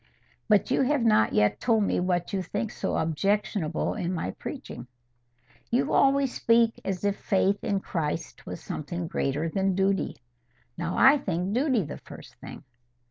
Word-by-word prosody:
But 210 +3 +3
you 265 - +3
have 270 -1 +2
not 215 - +4
yet 105 0 +2
told 225 -3 +2
me - - 0
what 180 +1 -1
you 195 - 0
think 205 +4 -3
so - - -2
objectionable 165 0 0
in 175 - -3
my 165 - -2
preaching." 120 - -8 0.8
"You 245 +3 +1
always 275 -1 +3
speak 230 0 +2
as 190 -1 -3
if 200 0 +1
faith 200 0 +1
in 195 -1 0
Christ 165 -3 -4
was - - -7
something 170 +3 -4
greater 145 0 -1
than 190 +2 0
duty. 195 +1 0 0.6
Now 170 +1 -3
I 280 +2 +6
think 185 -2 -2
duty 255 -3 +2
the 145 - -7
first - - -12
thing." - - -10
195 Hz, 160 wpm, -27 LUFS, 170-225 Hz, 0.8 s, I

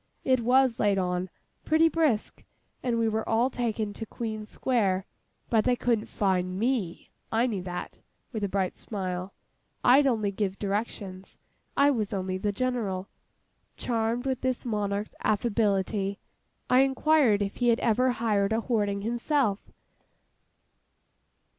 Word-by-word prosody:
It 260 -1 +3
was 250 +1 +3
laid 205 -2 +3
on—pretty 185 - 0
brisk—and 255 -4 -2
we 230 -1 +2
were 220 0 -1
all 235 +4 +2
taken 220 -4 -2
to 225 - -6
Queen 215 -2 -5
Square: 200 -7 0 0.4
but 220 -2 +3
they 250 +2 +3
couldn't 235 -3 0
fine 185 -2 0
me. 220 -6 -1 0.2
I 225 +2 +3
knew 210 -7 -2
that,'—with 180 +4 -7
a 200 - 0
bright 190 -1 -1
smile—'I'd 195 +7 -1
only 215 -5 +1
give 195 -1 -2
directions—I 205 +6 -2
was 215 -6 -1
only 185 -1 -2
the 205 +1 0
General.' 200 -5 -2 0.7
Charmed 230 +1 -1
with 260 -2 -1
this 255 -1 -1
monarch's 205 -2 -2
affability, 205 -2 +1 0.5
I 250 - +5
inquired 270 -5 +3
if 195 - -5
he 245 - +1
had 235 -1 +4
ever 245 +3 +3
hired 220 -4 +1
a 225 - +1
hoarding 205 -4 0
himself. 235 -1 0
220 Hz, 125 wpm, -28 LUFS, 200-245 Hz, 0.7 s, I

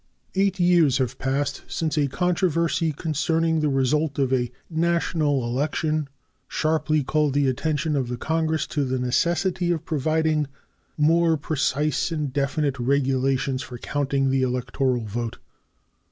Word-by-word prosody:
Eight 195 0 +1
years 175 -6 +4
have 130 -3 -2
passed 135 +2 -1
since 160 -1 -2
a 145 -2 +2
controversy 170 +1 +1
concerning 160 +2 0
the 150 -1 +1
result 140 +3 +1
of 135 -2 +1
a 125 -2 0 0.2
national 160 -5 0
election 150 +4 -1 0.4
sharply 155 -1 +1
called 150 0 +1
the 145 -1 +3
attention 150 +3 0
of 135 -3 0
the 125 0 -4
Congress 160 +2 0
to 145 - +1
the 130 -1 -1
necessity 170 +8 0
of 165 -1 -2
providing 155 0 +1 0.5
more 165 +2 +3
precise 150 0 0
and 150 -5 -2
definite 140 0 0
regulations 135 0 +1
for 125 - -8
counting 135 +1 0
the 135 0 +2
electoral 125 -1 0
vote. 115 +2 -4
150 Hz, 135 wpm, -24 LUFS, 135-160 Hz, 0.5 s, years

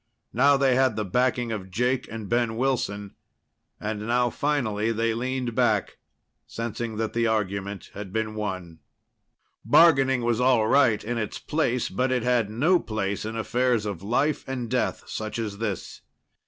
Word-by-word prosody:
Now 140 +3 +5
they 135 -2 +3
had 130 0 +3
the 110 - -2
backing 125 +3 0
of 100 -4 -5
Jake 125 +6 0
and 110 -2 -6
Ben 120 -1 0
Wilson. 105 -6 -1 0.7
And 105 0 -4
now 120 0 +2
finally 115 -8 0
they 115 0 0
leaned 125 +1 -2
back, - - +1 0.5
sensing 115 -1 -4
that 110 0 -2
the 115 0 +1
argument 100 -2 -2
had 100 -2 -7
been 110 0 -2
won. 95 -6 -5 0.8
Bargaining 135 -6 +5
was 120 0 +1
all 125 -4 +4
right 120 -5 +4
in 120 +2 -2
its 110 - -3
place, 130 -6 -1
but 130 +7 -1
it 125 -2 0
had 120 -4 +2
no 155 +12 +3
place 100 -5 -3
in 110 +1 -4
affairs 120 0 0
of 100 -5 -4
life 135 +9 0
and 125 -3 -4
death - - 0
such 110 0 -5
as 105 -3 -4
this. 105 -5 -4
115 Hz, 160 wpm, -25 LUFS, 105-125 Hz, 0.8 s, Now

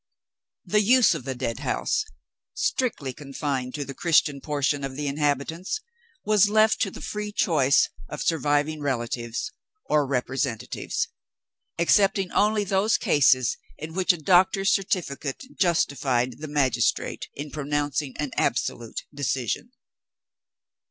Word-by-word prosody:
The 210 - +3
use 240 +2 +5
of 125 - -6
the 135 - -3
Deadhouse 120 -2 -1 0.5
(strictly 195 - -1
confined 135 -2 -4
to 145 -1 -3
the 140 - -7
Christian 150 -3 +2
portion 145 0 -1
of 135 -1 -4
the 145 +1 -3
inhabitants) 145 - -1 0.5
was 210 -1 +4
left 215 +1 +3
to 195 - +2
the - - -10
free 210 0 -4
choice 150 -9 +3 0.2
of - - -4
surviving 150 -1 +1
relatives 120 -3 -2 0.3
or 150 -2 +2
representatives 130 -3 -2 0.7
excepting 195 +2 +3
only 210 +1 +2
those 200 +3 +2
cases 130 -4 +3 0.2
in 155 +2 -7
which 185 +2 +3
a 175 - -3
doctor's 190 +4 +3
certificate 155 - -2 0.2
justified 135 - +1
the 155 - -6
magistrate 145 -4 0
in 145 +1 -6
pronouncing 145 -1 -2
an 145 -3 -3
absolute 115 -1 -1
decision. 135 - -2
145 Hz, 120 wpm, -25 LUFS, 135-190 Hz, 0.7 s, use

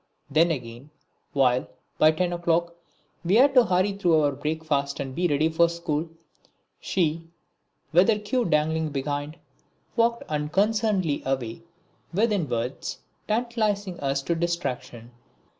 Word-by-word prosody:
Then 165 +4 +4
again, 125 -2 -5 0.4
while, 130 -2 +2 0.3
by 155 - +7
ten 175 +3 0
o'clock, 170 0 0 0.5
we 180 +4 +2
had 270 +4 +6
to 250 -3 +6
hurry 185 +2 +2
through 175 -5 +3
our 145 -1 +2
breakfast 145 -1 -2
and 135 -1 -4
be 175 +5 +1
ready 150 0 +2
for 165 +1 +3
school, 165 -1 -3 0.7
she, 165 -2 -1 0.6
with 180 +6 +5
her 215 - +4
queue 210 +4 -1
dangling 160 0 +1
behind, 145 +2 -3 0.6
walked 235 0 +2
unconcernedly 190 +2 0
away, 130 0 -3 0.5
withinwards, 155 - -1 0.3
tantalising 215 -5 -1
us 135 0 -1
to 170 - 0
distraction. 165 -8 -3
165 Hz, 125 wpm, -25 LUFS, 145-190 Hz, 0.7 s, by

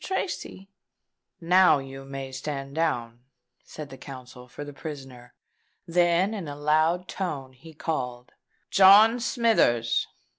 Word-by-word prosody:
"Now 180 -1 +5
you 135 0 -8
may 135 -1 -7
stand 135 +1 -6
down," 120 -8 -2 0.4
said 150 -3 -10
the 135 - -11
counsel 125 -2 -11
for 140 +4 -9
the 145 - -9
prisoner: 135 -5 -10 0.5
then, 175 +3 +2
in 195 -7 -5
a 145 - -6
loud 155 +5 +1
tone, 140 -9 -5
he 160 +5 -15
called, 125 -6 -4 0.4
"John 210 +5 +7
Smithers!" 220 - +1
145 Hz, 115 wpm, -26 LUFS, 130-175 Hz, 0.5 s, John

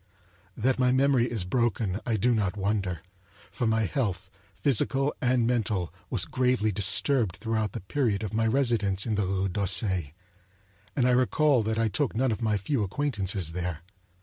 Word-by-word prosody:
That 130 +3 +1
my 125 -1 +3
memory 130 -2 +3
is 110 -6 -3
broken, 110 -1 -1
I 115 -2 +1
do 120 +4 +2
not 105 -3 -1
wonder; 100 -3 -2 0.5
for 120 - -2
my 110 0 +1
health, 105 - -3 0.2
physical 135 +1 +2
and 125 -2 +2
mental, 110 -7 -1 0.2
was - - -2
gravely 125 -4 +1
disturbed 105 +1 +3
throughout 110 -1 -2
the - - -5
period 110 +1 -1
of 105 - -5
my 115 +1 +1
residence 110 -6 +1
in 110 - -1
the 105 -2 0
Rue 95 0 0
d'Auseil, 95 -1 +1 0.9
and 125 - +2
I - - +3
recall 130 +2 +3
that 110 +1 -2
I 115 0 +2
took 115 +6 -1
none 130 +1 +1
of 110 - -3
my 110 -2 +1
few 115 +6 -1
acquaintances 100 - -1
there. 85 -2 -4
110 Hz, 170 wpm, -27 LUFS, 95-125 Hz, 0.9 s, my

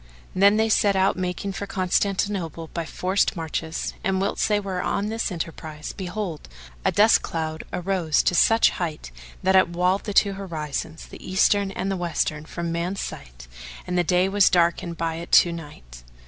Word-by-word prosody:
Then 200 +3 +5
they 220 0 +3
set 205 -2 +3
out 190 +1 +3
making 185 +2 -3
for 200 +1 -5
Constantinople 185 -4 -1
by 170 -1 -3
forced 190 +5 0
marches, 160 -1 -4
and 190 -1 0
whilst 195 +1 0
they 210 -1 +3
were 190 -3 -3
on 205 +3 -1
this 225 -1 -2
enterprise, 160 -3 -6
behold, 185 - -5 0.3
a - - +2
dust 215 +2 +5
cloud 160 -1 -4
arose 180 -3 0
to - - +2
such 225 +6 +5
height 155 - -5 0.3
that 190 +1 +3
it 185 -2 +5
walled 180 +3 0
the 205 - -3
two 200 -1 +4
horizons, 160 -4 -5
the - - -13
eastern 195 +2 +2
and 195 0 -3
the 195 - -1
western, 155 -3 -2
from 170 +1 -4
man's 175 +4 -2
sight - - -8 0.4
and 180 - -3
the 175 - +3
day 180 +2 +2
was 200 0 +4
darkened 170 -1 +1
by 165 -1 -2
it 170 +1 -8
to 175 - +7
night. 60 - -10
180 Hz, 175 wpm, -24 LUFS, 165-195 Hz, 0.4 s, to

